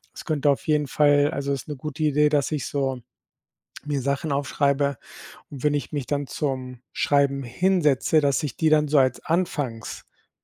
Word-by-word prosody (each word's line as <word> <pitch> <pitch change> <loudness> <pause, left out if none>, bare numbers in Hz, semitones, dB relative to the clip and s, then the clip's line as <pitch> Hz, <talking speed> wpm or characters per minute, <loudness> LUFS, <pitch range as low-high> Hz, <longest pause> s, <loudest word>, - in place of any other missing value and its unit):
es - - -8
könnte 150 -3 +1
auf 140 - 0
jeden 150 -2 +1
Fall 145 +1 +3
also, 140 -3 -3
ist 135 - -5
'ne 150 - -5
gute 150 +3 -5
Idee, 150 0 +3
dass 145 -1 +1
ich 150 - -2
so 135 -3 -2 0.9
mir 145 -2 -1
Sachen 140 +3 -1
aufschreibe 140 0 0 0.5
und 140 -3 -9
wenn 150 -1 +2
ich 145 - -3
mich 145 -4 -4
dann 145 -1 -1
zum 130 -2 -4
Schreiben 140 -1 +1
hinsetze, 155 +1 +2
dass 140 -2 +1
ich 140 -6 -4
die 160 - +2
dann 150 -1 +3
so 145 +1 +2
als 130 -2 +2
Anfangspunkt 145 -9 -3
145 Hz, 180 wpm, -24 LUFS, 135-150 Hz, 0.9 s, Fall